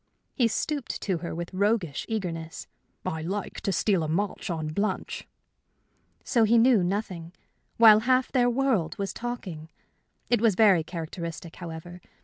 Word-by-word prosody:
He 240 - +3
stooped 280 +4 -2
to 185 -5 0
her 170 -1 -5
with 170 +2 -5
roguish 200 -6 0
eagerness. 165 -7 -4 0.4
"I 160 - -2
like 195 +5 -4
to 195 - -1
steal 190 0 +2
a 155 - -1
march 195 +7 -2
on 160 -3 -2
Blanche." 200 +7 -2 1.0
So 235 -4 +2
he 225 +2 +4
knew 230 -4 +5
nothing 180 -3 -3 0.4
while 220 -2 +8
half 255 +2 +2
their 245 -2 +3
world 240 -10 0
was 195 -1 -3
talking! 190 -10 -6 0.6
It 240 -3 +2
was 225 -5 +4
very 195 -6 +5
characteristic, 165 0 -6
however. 175 +1 -8
195 Hz, 145 wpm, -27 LUFS, 165-225 Hz, 1.0 s, while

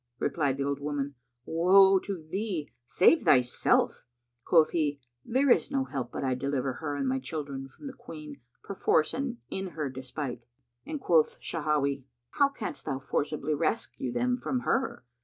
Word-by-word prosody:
Replied 140 -1 0
the 140 - -1
old 140 0 -1
woman, 145 -1 -3 0.3
"Woe 190 +4 +6
to 185 -5 -6
thee! 185 -4 -3 0.2
Save 185 - +5
thyself." 125 -1 +3 0.4
Quoth 160 +1 +4
he, 150 -4 0 0.2
"There 265 +2 +2
is - - +4
no 275 -1 0
help 130 - -4
but - - -4
I 130 -1 +1
deliver 135 0 -1
her 145 0 -4
and 140 -1 -1
my 130 +1 +1
children 135 -1 -5
from 135 - -15
the 275 - -5
Queen 155 - -10 0.2
perforce 175 -5 +1
and 260 -3 -3
in 190 -3 -4
her 145 -4 -2
despite;" 130 -1 -5 0.4
and 305 - -4
quoth 165 - +3
Shawahi, 145 -4 -1 0.3
"How 280 -1 +3
canst 250 -6 -6
thou 135 -3 -1
forcibly 145 +2 -2
rescue 130 -3 -1
them 250 - +1
from 255 0 -2
her? 255 - -1
150 Hz, 160 wpm, -29 LUFS, 140-195 Hz, 0.4 s, Woe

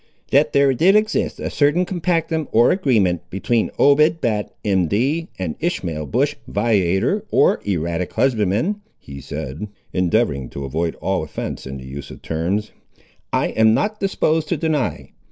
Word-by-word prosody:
"That 140 +3 +4
there 140 -1 +4
did 180 - +4
exist 215 0 +1
a - - -4
certain 150 +5 +2
compactum, 165 -3 -1
or 115 +2 +5
agreement, 110 - +1
between 110 +4 0
Obed 150 +3 +4
Batt, 110 -6 -1
M.D., 105 - +1
and 90 -5 -3
Ishmael 85 - -2
Bush, 140 - +1
viator, 100 -5 +1
or - - +3
erratic 85 -1 -2
husbandman," 120 - +1 0.2
he 70 0 -10
said, 75 +8 -6 0.3
endeavouring 90 - +1
to 70 - -6
avoid 80 +4 -2
all - - -1
offence - - -6
in 65 +1 -6
the 65 - -10
use 70 +2 -8
of - - -12
terms, 90 +7 -2 0.6
"I - - +1
am 110 0 +4
not 210 - -1
disposed 160 -5 0
to - - 0
deny. 155 -6 -2
110 Hz, 150 wpm, -20 LUFS, -, 0.6 s, or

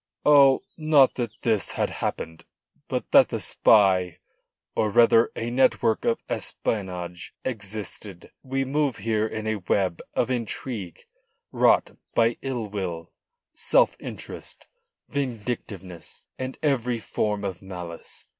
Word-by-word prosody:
"Oh, 140 -2 +6
not 155 -4 +5
that 120 -2 -2
this 110 -4 +1
had - - -1
happened. 80 0 -4 0.4
But - - -3
that - - +7
the - - -2
spy 95 -5 +4 0.6
or 110 - +1
rather 115 +2 +5
a 115 +1 -3
network 120 -3 +2
of 115 - +1
espionage 90 -4 -4
existed. 105 -4 -5
We 135 0 -2
move 140 -1 0
here 110 +1 0
in 110 0 -5
a 110 0 0
web 95 -2 0
of - - +1
intrigue 115 -6 -4 0.5
wrought - - +3 0.2
by 115 0 +3
ill 130 -4 -3
will, 90 -5 -5 0.4
self - - +3
interest, - - -8 0.4
vindictiveness 110 - -5 0.2
and 130 0 -4
every 125 -5 +1
form 105 -2 -2
of 95 -3 -4
malice. 90 -3 -8
110 Hz, 120 wpm, -25 LUFS, 95-130 Hz, 0.6 s, that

